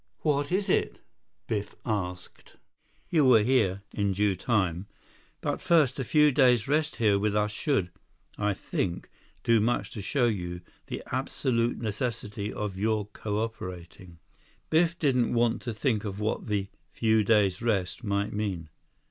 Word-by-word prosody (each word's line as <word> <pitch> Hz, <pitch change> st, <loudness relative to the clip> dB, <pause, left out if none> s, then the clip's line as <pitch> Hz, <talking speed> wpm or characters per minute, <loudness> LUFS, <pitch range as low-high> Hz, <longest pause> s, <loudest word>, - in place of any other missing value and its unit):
"What 145 Hz, -1 st, 0 dB
is 195 Hz, +2 st, +1 dB
it?" -, -, +1 dB, 0.5 s
Biff 105 Hz, -2 st, -3 dB
asked. 90 Hz, -5 st, -4 dB, 0.6 s
150 -, -, -3 dB
"You 155 Hz, -, +6 dB
will 120 Hz, -5 st, +6 dB
hear, 105 Hz, -6 st, +2 dB
in 100 Hz, -2 st, 0 dB
due 100 Hz, 0 st, +1 dB
time. 95 Hz, -2 st, 0 dB, 0.5 s
But -, -, -2 dB
first, 150 Hz, -6 st, +3 dB
a -, -, 0 dB
few 150 Hz, +3 st, +4 dB
days 125 Hz, -5 st, +4 dB
rest 150 Hz, +2 st, +1 dB
here 105 Hz, -4 st, +3 dB
with 105 Hz, 0 st, 0 dB
us 105 Hz, 0 st, +1 dB
should, 105 Hz, -, 0 dB, 0.4 s
I 105 Hz, -1 st, 0 dB
think, 90 Hz, -1 st, -3 dB, 0.3 s
do 115 Hz, -1 st, +4 dB
much 120 Hz, +3 st, 0 dB
to 105 Hz, -, -6 dB
show 125 Hz, +5 st, +1 dB
you 90 Hz, -6 st, -2 dB, 0.3 s
the -, -, -5 dB
absolute 120 Hz, -2 st, 0 dB
necessity 110 Hz, -2 st, -3 dB
of 100 Hz, -3 st, -4 dB
your 110 Hz, 0 st, +1 dB
cooperating." 95 Hz, -5 st, -5 dB, 0.5 s
Biff 165 Hz, +1 st, +3 dB
didn't 125 Hz, -7 st, +2 dB
want 120 Hz, -1 st, +2 dB
to 120 Hz, -, -4 dB
think 110 Hz, -1 st, 0 dB
of 100 Hz, -1 st, -5 dB
what 110 Hz, +2 st, -2 dB
the 100 Hz, -2 st, -1 dB, 0.2 s
"few 110 Hz, -1 st, +2 dB
days 100 Hz, -3 st, +3 dB
rest" 100 Hz, -3 st, -1 dB
might 100 Hz, -1 st, -1 dB
mean. 95 Hz, -6 st, -3 dB
105 Hz, 150 wpm, -28 LUFS, 100-125 Hz, 0.6 s, You